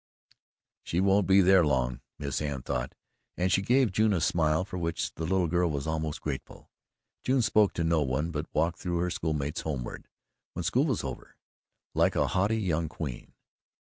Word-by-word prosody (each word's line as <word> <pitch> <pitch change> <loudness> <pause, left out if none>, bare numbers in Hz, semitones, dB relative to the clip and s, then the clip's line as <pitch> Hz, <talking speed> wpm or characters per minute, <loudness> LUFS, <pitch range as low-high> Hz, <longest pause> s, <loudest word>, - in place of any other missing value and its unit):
"She 85 - -2
won't 95 0 +3
be 95 +1 +6
there 95 0 +6
long," 65 -5 0 0.2
Miss 70 -1 -3
Anne 70 -4 -3
thought, 65 +1 -3 0.4
and 90 +1 +1
she 95 - +3
gave 125 +2 +3
June 110 +2 +2
a 90 - +1
smile 80 +1 +1
for 90 -2 -6
which 85 -1 -2
the 80 - -4
little 95 +1 +2
girl 85 +1 +1
was 70 -2 -3
almost 80 0 -2
grateful. 70 -3 -6 0.5
June 130 -1 +2
spoke 105 -3 +4
to 85 - -1
no 80 -1 +2
one, 75 +4 -1
but 75 0 -4
walked 85 +2 0
through 85 -1 -2
her 90 +1 0
schoolmates 75 -2 -2
homeward, 70 -6 -5 0.5
when - - -4
school - - +2
was - - -1
over, - - -7 0.6
like - - +2
a - - +3
haughty 100 +4 +1
young 85 -6 -1
queen. 75 -7 -6
85 Hz, 180 wpm, -29 LUFS, 75-95 Hz, 0.6 s, be